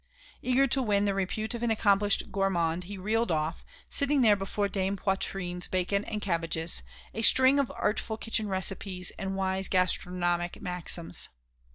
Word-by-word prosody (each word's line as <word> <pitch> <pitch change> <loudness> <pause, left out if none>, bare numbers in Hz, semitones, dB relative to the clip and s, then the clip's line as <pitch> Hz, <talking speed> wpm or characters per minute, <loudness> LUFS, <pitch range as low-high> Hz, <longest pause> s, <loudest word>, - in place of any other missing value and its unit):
Eager 255 +2 +2
to 270 0 +1
win 205 -4 +1
the 200 - +1
repute 195 +4 -2
of 235 - -4
an 240 - 0
accomplished 205 -2 +2
gourmand 180 -3 0
he 200 +2 -7
reeled 220 +5 -1
off, 155 +1 -2 0.2
sitting 280 -1 +3
there 215 -3 +6
before 200 +1 -2
Dame 195 0 -2
Poitrine's 185 -2 -2
bacon 190 +2 -1
and 210 -2 -5
cabbages, 165 - 0 0.3
a 225 - -4
string 260 +4 +6
of 275 - 0
artful 220 +1 -2
kitchen 225 -1 -2
recipes 190 -1 -1
and 195 0 -3
wise 190 0 0
gastronomic 175 -1 +1
maxims. 180 -1 0
195 Hz, 155 wpm, -28 LUFS, 180-215 Hz, 0.3 s, there